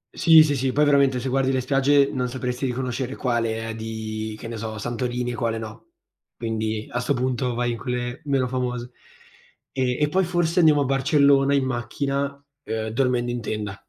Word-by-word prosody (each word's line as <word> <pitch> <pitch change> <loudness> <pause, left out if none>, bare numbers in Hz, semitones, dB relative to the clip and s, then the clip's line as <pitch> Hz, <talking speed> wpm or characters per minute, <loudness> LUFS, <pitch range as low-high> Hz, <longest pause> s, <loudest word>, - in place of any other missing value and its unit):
Sì, 160 -2 +7
sì, 145 -2 0
sì. 130 0 0
Poi, 150 +3 +3
veramente, 140 -3 +3
se 125 - -4
guardi 135 0 +1
le 130 - +1
spiagge, 135 +2 +3
non 125 -2 -2
sapresti 125 +1 -3
riconoscere 125 +1 -3
quale 115 -2 -1
è 115 - -5
di, 110 -1 -5
che 115 - -8
ne 115 0 -6
so, 110 0 -5
Santorini, 120 +2 -2
e - - -4
quale 115 -1 -1
no. 110 0 -9 0.4
Quindi, 110 -1 -2
a 120 - -1
'sto 140 +3 0
punto, 125 0 -1
vai 120 0 0
in 115 - -3
quelle 125 0 -4
meno 135 -3 +1
famose. 125 -1 -3 0.8
E 130 -2 -1
e 150 - +3
poi, 190 +5 +2
forse, 175 0 0
andiamo 155 -4 +5
a 140 - +1
Barcellona 140 +1 +3
in 135 - +1
macchina, 135 +3 -2 0.4
uhm, 110 0 -3
dormendo 120 0 0
in 120 -1 -3
tenda. 105 -2 -4
125 Hz, 190 wpm, -23 LUFS, 115-135 Hz, 0.8 s, Sì